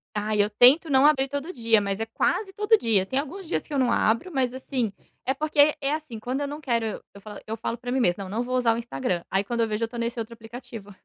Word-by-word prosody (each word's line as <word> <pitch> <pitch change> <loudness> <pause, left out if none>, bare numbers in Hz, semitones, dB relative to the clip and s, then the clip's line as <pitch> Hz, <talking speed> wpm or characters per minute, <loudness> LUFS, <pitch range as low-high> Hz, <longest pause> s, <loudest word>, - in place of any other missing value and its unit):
Ai, 210 0 +1
eu 205 - +1
tento 255 +9 +6
não 270 0 +5
abrir 280 -3 +4
todo 285 +6 -4
dia, 230 -3 +3
mas 200 0 -2
é 225 - -1
quase 385 - -1
todo 420 +3 +3
dia. 220 - +2
Tem 260 +7 -1
alguns 340 +7 -6
dias 345 - -1
que 305 - -8
eu - - 0
não 250 -2 +2
abro, 230 +15 +1
mas 255 -3 0
assim, 260 -4 -2 0.3
é 265 - +1
porque 300 +1 +3
é 275 +1 0
assim, 305 -8 -5
quando 255 +5 -3
eu 285 - -1
não 295 +2 -6
quero 235 -5 0
eu 215 - -5
eu 200 - -12
falo 210 +1 -9
eu 220 +1 -4
falo 230 +1 -3
pra 245 +1 -6
mim 265 - +1
mesmo: 195 -4 +1
"não 190 - -8
não 225 +5 -1
vou 255 +1 -3
usar 240 -2 +3
o - - -4
Instagram", 175 - -3
aí 195 +1 +1
quando 235 +3 -2
eu 225 - +2
vejo, 215 +1 -2
eu - - +1
tô 240 +1 -9
nesse 235 +1 -2
outro 230 +1 -5
aplicativo. 230 -2 -10
240 Hz, 280 wpm, -25 LUFS, 220-280 Hz, 0.3 s, tento